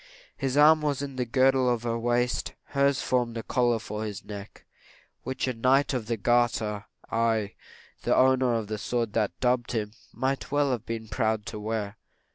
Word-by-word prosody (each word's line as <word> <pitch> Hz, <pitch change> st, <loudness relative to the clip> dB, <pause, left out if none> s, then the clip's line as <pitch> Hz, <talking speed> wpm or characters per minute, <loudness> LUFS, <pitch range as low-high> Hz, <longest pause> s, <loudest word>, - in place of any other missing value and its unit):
His 135 Hz, 0 st, -2 dB
arm 155 Hz, +1 st, +7 dB
was 145 Hz, -2 st, 0 dB
the 135 Hz, -3 st, -3 dB
girdle 130 Hz, +1 st, +3 dB
of 120 Hz, -1 st, 0 dB
her 115 Hz, -1 st, -1 dB
waist; 120 Hz, +1 st, 0 dB, 0.2 s
hers 140 Hz, -1 st, +2 dB
formed 120 Hz, -2 st, 0 dB
a 115 Hz, -, -4 dB
collar 120 Hz, -2 st, +2 dB
for 105 Hz, -1 st, -5 dB
his 105 Hz, -2 st, -6 dB
neck, 100 Hz, -1 st, -9 dB, 0.6 s
which 130 Hz, 0 st, -3 dB
a 130 Hz, -, 0 dB
knight 130 Hz, +5 st, +2 dB
of 120 Hz, -4 st, -2 dB
the 115 Hz, 0 st, -1 dB
garter 110 Hz, -2 st, +1 dB, 0.3 s
aye, 115 Hz, -2 st, +1 dB, 0.5 s
the -, -, +2 dB
owner 130 Hz, -2 st, +4 dB
of 115 Hz, -2 st, -1 dB
the 105 Hz, 0 st, -4 dB
sword 115 Hz, 0 st, -2 dB
that 90 Hz, -4 st, -1 dB
dubbed 125 Hz, -1 st, +1 dB
him 105 Hz, -3 st, -2 dB, 0.2 s
might 135 Hz, +1 st, -2 dB
well 145 Hz, -1 st, +2 dB
have 120 Hz, -2 st, -3 dB
been 115 Hz, -1 st, -4 dB
proud 110 Hz, -1 st, -1 dB
to 115 Hz, -3 st, -6 dB
wear. 105 Hz, -1 st, -3 dB
120 Hz, 180 wpm, -27 LUFS, 110-130 Hz, 0.6 s, arm